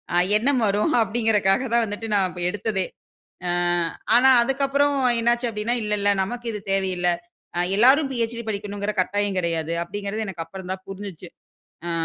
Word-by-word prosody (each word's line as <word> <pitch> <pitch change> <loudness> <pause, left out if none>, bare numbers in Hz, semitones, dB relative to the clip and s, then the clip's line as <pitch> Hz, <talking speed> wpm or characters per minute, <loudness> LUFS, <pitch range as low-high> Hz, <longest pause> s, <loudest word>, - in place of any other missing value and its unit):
அ - - +4 0.2
எண்ணம் 255 +2 +1
வரும் 210 +11 +1
அப்டிங்கறகாக 220 -1 +1
தான் 235 - +4
வந்துட்டு 210 +2 -5
நான் 185 -2 0
எடுத்ததே. 200 -1 -2 0.6
ஆ - - 0 0.7
ஆனா, 260 +2 +6
அதுக்கு 270 +3 -1
அப்புறம் 285 +1 +2 0.2
என்ன 235 +1 +3
ஆச்சு 240 +1 -2
அப்டின்னா, 215 +3 -1
இல்ல, 210 - -3
இல்ல 205 - +3
நமக்கு 240 +4 -6
இது 210 - -5
தேவையில்ல. 185 -2 0 0.5
அ - - +1 0.2
எல்லோரும் 270 +6 +5
பிஎச்டி 235 -1 -2
படிக்கணும்ங்குற 205 0 -3
கட்டாயம் 205 0 -1
கிடையாது. 165 -2 -1
அப்டிங்குறது 205 +4 -4
எனக்கு 170 -4 -5
அப்புறம் 185 +2 -9
தான் 190 0 -4
புரிஞ்சுச்சு. 195 -3 -8 0.6
அ - - -2
205 Hz, 160 wpm, -23 LUFS, 190-235 Hz, 0.7 s, ஆனா